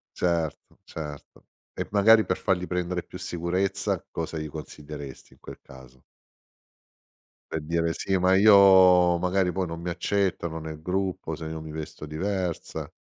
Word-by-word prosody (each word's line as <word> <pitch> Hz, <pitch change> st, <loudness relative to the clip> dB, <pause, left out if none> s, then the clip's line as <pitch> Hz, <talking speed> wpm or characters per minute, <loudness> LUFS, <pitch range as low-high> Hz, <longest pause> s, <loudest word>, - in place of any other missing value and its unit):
Certo, 85 Hz, -3 st, -2 dB
certo 75 Hz, -3 st, -9 dB, 0.3 s
e -, -, -4 dB
magari 110 Hz, +2 st, +6 dB
per 90 Hz, -, -1 dB
fargli 90 Hz, -1 st, 0 dB
prendere 90 Hz, 0 st, -2 dB
più 90 Hz, -, -11 dB
sicurezza 95 Hz, +2 st, -2 dB
cosa 80 Hz, 0 st, -4 dB
gli 75 Hz, 0 st, -4 dB
consiglieresti 75 Hz, -2 st, -9 dB
in -, -, -25 dB
quel -, -, -10 dB
caso? 65 Hz, -1 st, -16 dB, 1.5 s
Per 80 Hz, -, -2 dB
dire: 85 Hz, +1 st, -1 dB
"Sì 95 Hz, -, -1 dB
ma 95 Hz, +1 st, +3 dB
io 95 Hz, -3 st, +7 dB
magari 90 Hz, +1 st, +1 dB
poi 95 Hz, 0 st, -1 dB
non 85 Hz, 0 st, -6 dB
mi 90 Hz, -, -4 dB
accettano 85 Hz, -2 st, -1 dB
nel 80 Hz, 0 st, -8 dB
gruppo, 95 Hz, -3 st, -2 dB
se 80 Hz, +1 st, -6 dB
io 80 Hz, 0 st, -5 dB
mi 80 Hz, -1 st, -8 dB
vesto 80 Hz, 0 st, -7 dB
diversa." 90 Hz, +2 st, -3 dB
85 Hz, 145 wpm, -26 LUFS, 80-95 Hz, 1.5 s, io